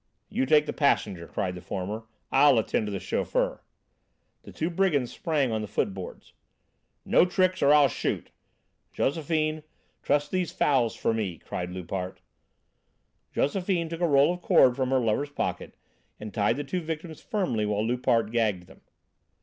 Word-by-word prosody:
"You 130 - -1
take 150 +1 +5
the - - -4
passenger!" 100 - +1
cried 90 -1 -2
the 90 - -8
former; 100 +5 -5 0.3
"I'll 135 -2 +6
attend 110 -1 0
to - - -3
the 100 - -3
chauffeur." - - -1 0.8
The - - -12
two 165 +3 -2
brigands 165 -9 +1
sprang 145 -6 0
on 110 -1 -1
the 105 - -5
footboards. 95 -2 -4 0.7
"No - - +5
tricks, 185 +1 +1
or 140 - +5
I'll 150 -1 +7
shoot! - - -3 0.6
Josephine, 155 +1 0 0.4
truss 145 0 +1
these 180 0 -1
fowls 125 -6 +1
for 115 - 0
me!" 100 -7 -2
cried 90 +3 -5
Loupart. 90 +1 -5 1.1
Josephine 175 +1 0
took 165 +1 -6
a 175 - +3
roll 145 +2 +4
of 180 - -8
cord 125 -6 +5
from 130 -1 -1
her 135 - +3
lover's 125 +4 0
pocket 145 - -4 0.4
and 105 -1 -8
tied 105 +3 +1
the 145 - -2
two 175 +6 -3
victims 160 0 -6
firmly 125 - -1
while 105 +1 0
Loupart 115 -2 +1
gagged 110 -6 0
them. - - -18
135 Hz, 160 wpm, -27 LUFS, 105-155 Hz, 1.1 s, I'll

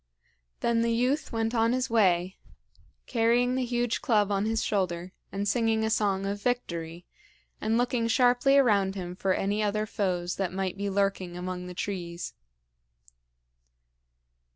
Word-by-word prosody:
Then 235 -1 +2
the 230 0 +1
youth 255 +6 0
went 225 0 -1
on 230 0 +2
his 255 0 0
way, 190 -6 +2 0.7
carrying 240 +1 +2
the 260 0 0
huge 240 -1 -1
club 210 -5 +2
on 200 +1 +1
his 225 0 0
shoulder, 180 -3 -1 0.2
and 200 +1 -2
singing 225 0 +1
a 220 - 0
song 200 -3 +1
of 200 +1 -3
victory, 170 -8 -3 0.6
and 225 +1 +1
looking 245 -1 +1
sharply 250 +3 +4
around 200 -7 +3
him 180 -2 -5
for 190 0 0
any 205 +2 0
other 215 0 0
foes 180 -4 -2
that 190 -3 -1
might 190 -1 -2
be 200 +1 -3
lurking 195 -3 -1
among 180 0 -5
the 180 - -8
trees. 175 -3 -4
205 Hz, 150 wpm, -28 LUFS, 185-235 Hz, 0.7 s, sharply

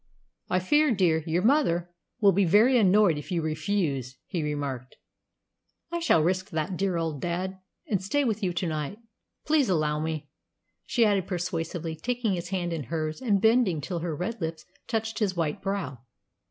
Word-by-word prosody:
"I 185 - +2
fear, 295 +11 +3
dear, 175 -7 +2
your 170 +3 +1
mother 195 - +2 0.3
will 200 -3 +6
be 200 +2 +3
very 210 +9 +5
annoyed 200 -7 +4
if 150 - -10
you 170 -3 0
refuse," 155 - -1
he 175 - -3
remarked. 140 -4 -4 1.0
"I 340 - -1
shall 165 - +3
risk 185 +3 0
that, 160 +1 -2
dear 190 -1 0
old 160 -4 -2
dad, 185 +2 -3 0.3
and 200 -4 0
stay 250 +10 +1
with 220 -4 -1
you 185 -3 0
to 175 +1 -2
night. 155 +4 -3 0.5
Please 300 -6 +3
allow 155 -4 +1
me," 155 -1 -3 0.6
she 235 - +3
added 200 -4 +2
persuasively, 170 -3 -3
taking 235 +4 -1
his 175 -1 -4
hand 175 -3 -2
in 155 -5 -4
hers 155 - -3
and 210 -6 +2
bending 220 -6 +3
till 175 +4 -3
her 165 -2 -3
red 215 +7 -4
lips 160 -1 -4 0.2
touched 225 -1 -2
his 200 -4 0
white 165 +3 -1
brow. 195 -11 -3
180 Hz, 175 wpm, -27 LUFS, 160-205 Hz, 1.0 s, will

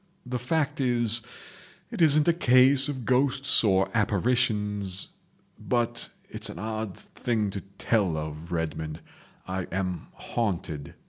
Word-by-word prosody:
The 125 0 -3
fact 145 +3 -1
is—it 120 +4 -3
isn't 155 -1 +4
a 170 - +5
case 135 -2 +6
of 130 -5 -5
ghosts 135 +2 +3
or 95 -3 +3
apparitions—but—it's 105 +1 -2
an - - -8
odd 110 -1 -4
thing 110 -4 -2
to 100 0 -5 0.2
tell 100 -8 +1
of, 75 +2 -6
Redmond—I 80 +3 -5
am 90 -2 -3
haunted. 85 -10 -4
110 Hz, 105 wpm, -27 LUFS, 95-125 Hz, 0.2 s, case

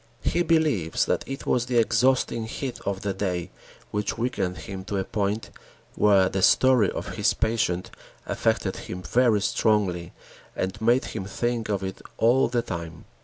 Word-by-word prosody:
He 175 - +1
believes 155 - +2
that - - 0
it 135 0 -6
was 125 0 +1
the 125 -1 0
exhausting 120 -1 +2
heat 130 +2 -5
of 100 -1 -1
the 100 -1 -2
day 90 -4 -3 0.4
which 105 +2 -2
weakened 110 -6 -1
him 95 -1 -7
to 100 0 -3
a 95 - 0
point 105 +1 -2 0.4
where 100 -3 +4
the 95 0 -2
story 125 -2 +5
of - - -5
his - - +2
patient 100 -6 0 0.3
affected - - 0
him 90 0 -7
very 120 -3 +3
strongly 95 -4 +1 0.4
and 95 +3 -3
made 120 +3 +3
him 105 -4 -4
think 115 +3 -2
of 100 -2 -1
it 95 0 -5 0.2
all 120 +4 +4
the 120 0 0
time. 85 -4 -6
105 Hz, 165 wpm, -25 LUFS, 95-120 Hz, 0.4 s, story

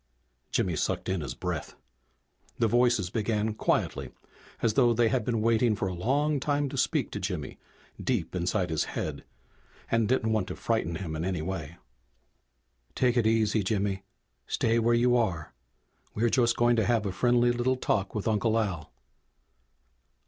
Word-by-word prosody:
Jimmy - - 0
sucked - - -2
in 95 -2 -1
his 70 - -5
breath. - - -4 0.8
The 115 - +2
voices 120 -5 +2
began 110 0 0
quietly, - - -1 0.5
as 115 - +3
though 120 -1 +4
they 115 0 +3
had 120 0 0
been 115 -1 -1
waiting 115 0 +3
for 95 - -2
a 95 - -3
long 140 - +1
time 145 +1 0
to - - -7
speak - - 0
to - - -4
Jimmy 90 -8 -4 0.4
deep 100 -11 -1
inside 90 0 -1
his 80 - 0
head, - - -3 0.7
and 115 -2 +2
didn't 115 -3 +1
want 105 -4 0
to - - -5
frighten 110 -8 -1
him 80 -3 -4
in 80 - -3
any 90 -3 -2
way. 85 -3 -5 1.2
"Take 125 -2 +2
it 115 -3 +3
easy, 110 -1 +2
Jimmy! 100 -1 -1 0.5
Stay 115 +1 +1
where 115 +1 +3
you 120 +1 +3
are. 95 -10 -1 0.6
We're 115 +2 +2
just 120 -2 +2
going 120 0 +3
to 110 - +2
have 115 -2 +1
a 100 - -1
friendly 120 +4 +3
little 120 +2 +1
talk 100 -5 -1
with 105 - -2
Uncle 110 +1 +2
Al." 95 -9 -2
110 Hz, 165 wpm, -28 LUFS, 95-120 Hz, 1.2 s, though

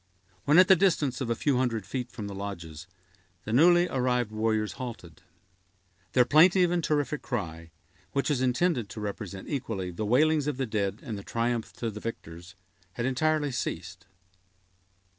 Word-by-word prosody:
When 150 +3 +5
at 185 0 +8
the 190 - +8
distance 160 -8 +1
of 125 - -2
a 115 - +1
few 140 0 +1
hundred 115 -5 -1
feet 125 +5 -4
from 110 - -7
the 100 - -6
lodges 85 -5 -7 0.6
the 110 - -3
newly 175 +6 +5
arrived 125 -5 0
warriors 110 -1 0
halted. 90 -9 -8 0.9
Their 125 +2 +5
plaintive 175 +5 +5
and 175 -1 0
terrific 150 -1 0
cry, 85 -8 -5 0.4
which 140 +2 0
was 135 -3 0
intended 125 - +1
to - - -8
represent 100 -2 -6
equally 110 -10 -3
the 100 +5 -4
wailings 150 +6 +3
of 150 -4 -2
the 135 - -1
dead 105 -2 -2
and 110 -7 -5
the - - -10
triumph 115 0 -2
to 115 -2 -4
the 105 - -8
victors, 90 -5 -8 0.4
had 120 - -3
entirely 145 +3 +1
ceased. 90 -5 -5
120 Hz, 165 wpm, -28 LUFS, 100-145 Hz, 0.9 s, at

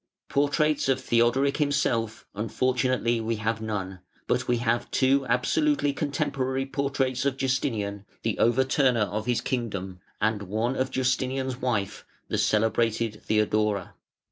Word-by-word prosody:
Portraits 145 +1 +1
of 130 -1 +2
Theodoric 130 +3 +2
himself, 115 -7 0
unfortunately 120 +2 0
we 115 +1 -1
have 110 +1 -2
none; 95 -4 -4 0.3
but - - 0
we 120 - +2
have 115 0 0
two 135 0 +2
absolutely 145 - +2
contemporary 135 -2 -1
portraits 135 -2 -1
of 140 -1 0
Justinian, 110 -7 -1 0.2
the 115 -2 0
overturner 125 -1 +3
of 105 +4 -4
his 120 -2 +1
kingdom, 100 -7 -3 0.2
and 110 -1 +1
one 110 +6 -1
of 130 0 0
Justinian's 130 0 -1
wife, 105 -5 -2 0.3
the - - 0
celebrated 110 0 +1
Theodora. 105 -2 +1
120 Hz, 125 wpm, -26 LUFS, 110-130 Hz, 0.3 s, overturner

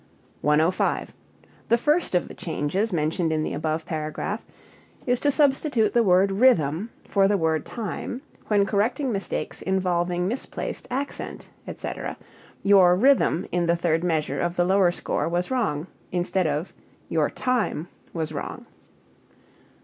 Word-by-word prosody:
105. 155 +5 +1 0.6
The 235 - +5
first 295 - +1
of 175 - +1
the - - -9
changes 170 +7 -2
mentioned 160 0 0
in 155 -1 0
the - - -3
above 155 0 -2
paragraph 160 +6 -3 0.6
is 245 -1 +1
to 290 - +2
substitute 275 -5 +2
the 240 - +4
word 190 -1 +4
rhythm 195 - +3
for 195 -1 +3
the 205 0 +2
word 160 -3 0
time 240 +3 -5 0.2
when 205 -2 +3
correcting 240 +7 0
mistakes 195 -2 -3
involving 180 -1 0
misplaced 245 +6 -4
accent, 275 +3 -4 0.2
etc. - - -5
E.g., 200 - -11
"Your 185 -3 +7
rhythm 250 -5 +3
in 175 -1 +1
the 170 - +3
third 165 -1 +1
measure 160 -3 0
of 175 0 -1
the 175 - +2
lower 190 0 +4
score 175 - -2
was 175 +6 -1
wrong," 205 - 0 0.3
instead 180 0 0
of 150 +4 -2 0.3
"Your - - +1
time 240 -10 -1 0.2
was 160 -2 -3
wrong." 145 - -6
185 Hz, 140 wpm, -25 LUFS, 165-225 Hz, 0.6 s, Your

